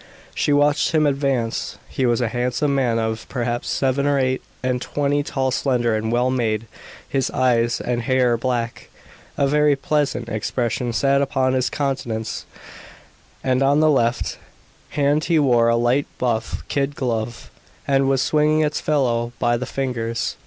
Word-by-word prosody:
She - - 0
watched 145 +2 +3
him 155 -1 +3
advance! 135 -5 -1
He 130 - -1
was 120 +1 +1
a 120 - 0
handsome 125 +4 0
man 125 -4 +1
of, 110 0 -3
perhaps, 120 -2 -2
seven 135 +1 +1
or 145 -1 +2
eight 130 -1 0 0.2
and 125 -1 0
twenty, 145 +1 0
tall, 135 -2 -1
slender 120 -4 +1
and 110 +1 -2
well 125 +2 +2
made, 115 -3 0 0.4
his 135 -1 0
eyes 120 -2 +1
and 120 -1 -2
hair 125 0 +2
black. 120 -1 -3 0.5
A 140 - +3
very 150 0 +3
pleasant 140 -4 -1
expression 120 +2 -2
sat 140 +3 +2
upon 130 -2 +1
his 130 -1 +1
countenance; 120 -6 -3 1.0
and 130 0 +1
on 140 +2 +4
the 155 0 +4
left 120 -3 0 0.5
hand 145 +1 +1
he 170 -2 +2
wore 120 -6 +4
a 115 - +3
light 120 +4 +1
buff 115 -3 -2
kid 140 0 -1
glove, 115 -2 -3 0.4
and 135 -1 +2
was 135 -1 +2
swinging 155 0 +2
its 150 -1 0
fellow 120 -5 0
by 120 0 +2
the 125 +2 -4
fingers. 115 -4 -2
130 Hz, 160 wpm, -21 LUFS, 120-140 Hz, 1.0 s, on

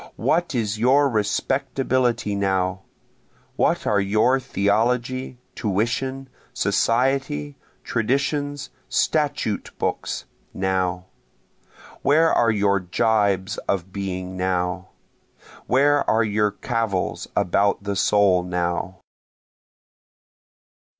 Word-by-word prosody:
What 170 -3 0
is 110 -2 -1
your 135 +5 +4
respectability 125 0 0
now? 95 -1 0 0.7
What - - +1
are 105 - +2
your 110 +7 +2
theology, 120 +4 0 0.2
tuition, 130 +6 -2 0.3
society, 115 - 0 0.3
traditions, 140 +4 -1 0.2
statute 145 - 0
books, - - -3 0.3
now? 95 -1 -1 1.0
Where 160 +4 +4
are 115 - +3
your 100 -2 +2
jibes 100 +1 0
of 95 -1 -2
being 95 -2 -4
now? 90 0 -1 0.8
Where 145 +2 +3
are 115 +1 +3
your 105 0 +1
cavils 110 -2 -2
about 100 +3 +1
the 100 0 -2
soul 100 -1 +3
now? 90 +1 -3
105 Hz, 85 wpm, -23 LUFS, 95-130 Hz, 1.0 s, your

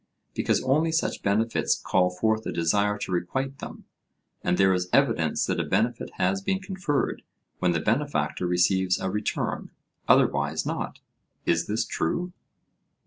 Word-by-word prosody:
Because - - +1
only 150 +5 +2
such 160 - -1
benefits 110 +3 +1
call 90 -1 +2
forth 110 +4 0
a - - -2
desire 100 +5 +1
to 100 - -5
requite 130 +10 -2
them, - - -9 0.6
and 90 0 +1
there 95 -1 +5
is 90 0 -1
evidence - - +2
that - - -1
a - - +1
benefit - - 0
has 95 +2 +1
been 190 - 0
conferred 185 -6 -2 0.4
when 90 -1 +2
the 85 - +1
benefactor 115 - 0
receives 90 +1 +2
a 95 - -2
return; 105 +1 -2 0.4
otherwise 75 +2 +3
not. - - -4 0.4
Is 85 0 +1
this 110 +2 0
true? 175 - -2
100 Hz, 145 wpm, -26 LUFS, 90-130 Hz, 0.6 s, there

